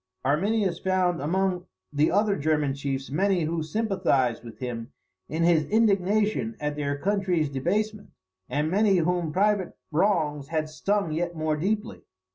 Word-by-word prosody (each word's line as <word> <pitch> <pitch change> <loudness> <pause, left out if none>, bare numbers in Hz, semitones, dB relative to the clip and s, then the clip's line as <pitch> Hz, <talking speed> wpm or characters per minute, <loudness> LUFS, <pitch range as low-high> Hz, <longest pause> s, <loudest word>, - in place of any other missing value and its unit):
"] - - -24
Arminius 185 +5 +1
found 185 -3 +1
among 180 +3 0 0.3
the 150 +2 +3
other 205 +2 +2
German 150 -2 +1
chiefs 135 -1 -4
many 185 +2 +2
who 165 +1 -1
sympathised 155 - 0
with 115 -2 -10
him 120 0 -5 0.4
in 160 +2 -1
his 165 -3 +3
indignation 215 +1 +2
at 150 0 -2
their 145 -1 -2
country's 180 -4 0
debasement, 205 +10 -1 0.4
and 150 +4 0
many 200 0 +3
whom 175 -1 0
private 200 +1 +1
wrongs 155 -5 +1
had 155 0 -2
stung 195 +3 -1
yet 170 +2 -2
more 155 -1 0
deeply. 210 +8 -2
170 Hz, 145 wpm, -26 LUFS, 150-200 Hz, 0.4 s, the